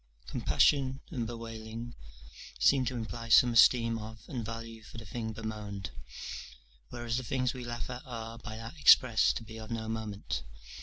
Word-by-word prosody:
Compassion 135 - +2
and 120 -7 -2
bewailing 115 0 -6 0.7
seem 135 -2 +5
to 125 +1 -2
imply 115 0 -5
some 120 +1 +7
esteem 115 0 +6
of 110 +1 -9
and 120 -4 -4
value 115 0 -6
for 110 - -12
the 110 - -8
thing 110 +1 -4
bemoaned; 105 -5 -5 1.0
whereas 120 0 -2
the 130 - -2
things 125 +1 0
we 130 -2 -6
laugh 120 0 -4
at 125 0 -6
are 115 -1 -6
by 110 0 -7
that 115 +8 -8
expressed 120 -5 +6
to - - -6
be 110 0 -9
of 110 - -8
no 115 -1 -3
moment. 110 -2 -3
115 Hz, 165 wpm, -31 LUFS, 110-120 Hz, 1.0 s, some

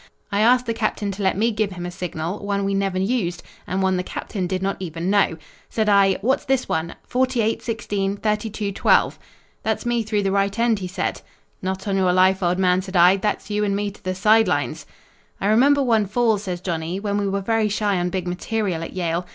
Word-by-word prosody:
I 200 - 0
asked 250 +3 +4
the 230 - -1
captain 215 -2 -1
to 195 +1 -6
let 190 -1 +1
me 230 +3 +2
give 210 -2 -1
him 175 -1 -6
a 175 - -4
signal; 175 +1 -4
one 200 -1 -1
we 200 - 0
never 195 -1 0
used, 185 -4 -1 0.2
and 190 +1 -1
one 190 -1 +2
the 180 - -1
captain 185 0 -4
did 185 +1 -2
not 195 0 -1
even 170 0 -3
know. 200 -5 +2 0.3
"Said 220 -2 0
I, 200 -1 +5
'What's 260 +6 +1
this 265 -1 0
one 160 +1 -2
48 250 -3 0
16 205 -4 -2
32 210 -1 -2
12?' 195 - +2 0.4
"'That's - - -2
me 240 -1 +1
through 215 -2 -1
the 195 - +1
right 200 +1 +1
end,' 230 -2 +2
he 185 - -4
said. 185 +1 -3 0.4
"'Not 190 +1 -3
on 195 -1 +1
your 185 -2 +3
life, 185 +1 +4
old 175 0 +1
man,' 185 -1 +3
said 190 0 -8
I, 180 +2 +6
'that's 210 +1 -2
you 210 0 0
and 200 -1 0
me 205 0 -1
to 200 - -19
the 185 0 -2
side 220 +4 +4
lines!' - - -2 0.5
"I - - -3
remember 270 +7 +4
one 225 -5 +2
fall," 225 0 +2
says 180 -3 -5
Johnny, 170 0 -3
"when 205 0 -1
we 200 - 0
were 195 0 -1
very 220 +1 +1
shy 205 -2 0
on 175 0 0
big 180 0 -3
material 185 -1 -2
at 165 - -6
Yale. 175 -1 -2
200 Hz, 225 wpm, -22 LUFS, 185-215 Hz, 0.5 s, I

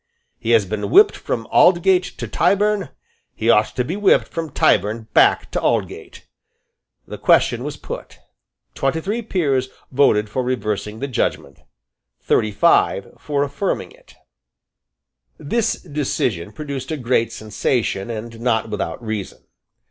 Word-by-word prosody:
He 115 - -5
has 115 -3 +4
been 105 +1 -3
whipped - - +6
from 115 - -4
Aldgate 180 +1 +5 0.2
to - - -5
Tyburn. 205 0 +1 0.5
He 115 +2 +2
ought 105 -1 +2
to 125 - 0
be 160 +9 -4
whipped 205 -1 +3
from 165 -2 -4
Tyburn 110 -2 +1
back - - +4
to - - -2
Aldgate." - - -2 0.8
The - - -8
question - - +3
was - - -5
put. - - -8 0.6
Twenty 135 +4 -1
three 210 +8 -3
peers 140 - 0 0.2
voted 115 -6 +3
for 120 +5 -2
reversing 110 -4 -3
the 140 - -2
judgment; 130 - -2 0.6
thirty 110 - +1
five 105 - +2
for 145 -1 -1
affirming 145 +7 -3
it, - - -20 1.2
This 225 +10 0
decision 130 - -2
produced 140 -1 -6
a 160 - -2
great 120 -3 0
sensation, 110 -1 -2
and 115 0 -6
not 115 -2 0
without 100 +1 -4
reason. 110 -3 -5
125 Hz, 135 wpm, -20 LUFS, 110-160 Hz, 1.2 s, whipped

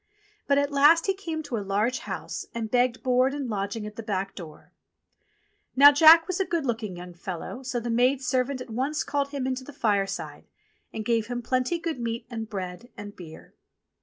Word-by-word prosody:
But 280 - +3
at 285 0 +1
last 295 +4 +5
he 390 - +2
came 330 -5 -5
to 275 -6 -4
a - - -2
large 205 +5 0
house - - -6
and 225 -2 -4
begged 245 0 +1
board 255 +1 +2
and 280 -3 -3
lodging 210 0 -3
at 210 0 -9
the - - -4
back 195 -3 -3
door. 155 -4 -12 1.0
Now 285 +2 +9
Jack 320 +2 +8
was 370 0 -3
a 385 - +1
good 335 -5 -1
looking 220 -6 -3
young 180 0 -9
fellow, 175 +7 -7
so 255 -2 -3
the 235 0 -4
maid 250 +3 +3
servant 255 0 -1
at 250 - -9
once 270 +7 -1
called 285 -1 -1
him 280 -2 -4
into 260 0 -2
the 290 - -10
fireside 200 -6 -2 0.4
and 220 - -5
gave 230 -2 +1
him 245 0 -4
plenty 255 +7 0
good 330 -5 -4
meat 230 0 -3
and 225 -2 -5
bread 190 +3 -6
and 205 0 -9
beer. 160 -3 -12
245 Hz, 200 wpm, -26 LUFS, 210-280 Hz, 1.0 s, Now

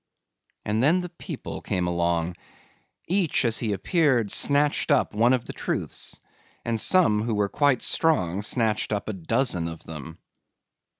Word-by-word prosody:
And 105 +2 -1
then 165 +8 +3
the 180 - -6
people 170 - -8
came 90 -1 -2
along. 85 0 -1 0.7
Each 180 -7 +1
as 115 -1 +3
he 110 -3 -2
appeared 120 - +1
snatched 145 +1 +3
up 145 -6 +2
one 115 +4 +3
of 130 -2 0
the - - -7
truths - - -2 0.5
and 115 -2 0
some 165 - +4
who 115 0 -2
were 105 -1 0
quite 145 0 +1
strong 100 - +1
snatched 110 -1 0
up 105 -1 -3
a - - -3
dozen 95 -1 0
of 80 -1 -8
them. 75 -5 -9
110 Hz, 155 wpm, -24 LUFS, 95-145 Hz, 0.7 s, some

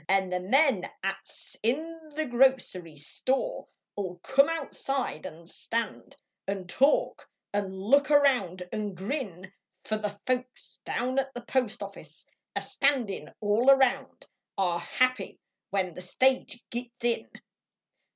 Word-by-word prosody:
An 190 -1 +3
the 180 0 0
men 255 - +3 0.2
at 195 0 0
s - - -10
in 315 +7 -2
the 315 0 0
grocery 245 - +2
store 265 - -1 0.3
Ll 185 -3 -3
come 275 +3 +5
outside 275 - -2
nd 165 +1 -12
stand 230 +5 -3 0.3
Xd 195 -2 -3
talk, 285 - +2 0.3
nd 200 -2 0
look 230 +11 +3
around 250 - +3
nd 210 -3 -3
grin; 190 - -4 0.3
Fer 215 - -1
the 205 -1 -4
folks 255 0 -2
down 255 +2 0
at 270 0 -2
the 245 - -4
postoffice 220 -5 -3 0.3
A - - 0
standin 265 -8 0
all 215 +5 +3
around 270 -2 +3 0.3
Are 175 -3 +1
happy 255 +8 0 0.3
when 190 -3 0
the 180 - -8
stage 255 +5 +1
conies 240 0 -4
in. 240 -1 +1
235 Hz, 130 wpm, -29 LUFS, 190-270 Hz, 0.3 s, come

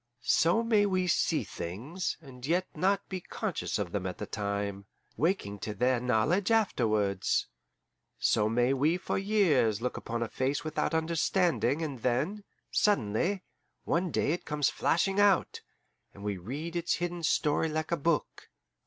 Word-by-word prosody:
So 175 +8 +3
may 215 -3 +3
we 185 -2 +1
see 175 - +1
things, 125 - -4
and 130 -4 -13
yet 175 +6 +1
not 195 +5 +1
be 185 -1 -5
conscious - - -3
of 85 - -3
them 95 -1 -2
at 90 - -5
the - - -4
time, 100 -1 -3 0.3
waking 130 - -1
to 105 +2 -5
their 125 +3 +2
knowledge 125 - +1
afterwards. 110 - +1 0.7
So 105 0 +2
may 120 +3 +2
we 150 +6 +2
for 185 - -2
years 175 - +2
look 125 +2 -3
upon 115 0 -3
a - - -3
face 130 +3 -1
without 155 +1 -1
understanding, 165 -3 +1
and 140 -5 -4
then, 140 - -1 0.3
suddenly, 180 - +1 0.4
one 180 +2 0
day 145 - +1
it 175 - -2
comes 150 -2 0
flashing 195 +4 +1
out, 200 -3 +3 0.5
and 100 - -11
we 105 -1 -1
read 145 - -6
its 170 0 +1
hidden 175 0 -3
story 155 0 +1
like 155 +1 -3
a - - +3
book. 160 +1 -1
150 Hz, 155 wpm, -30 LUFS, 115-180 Hz, 0.7 s, So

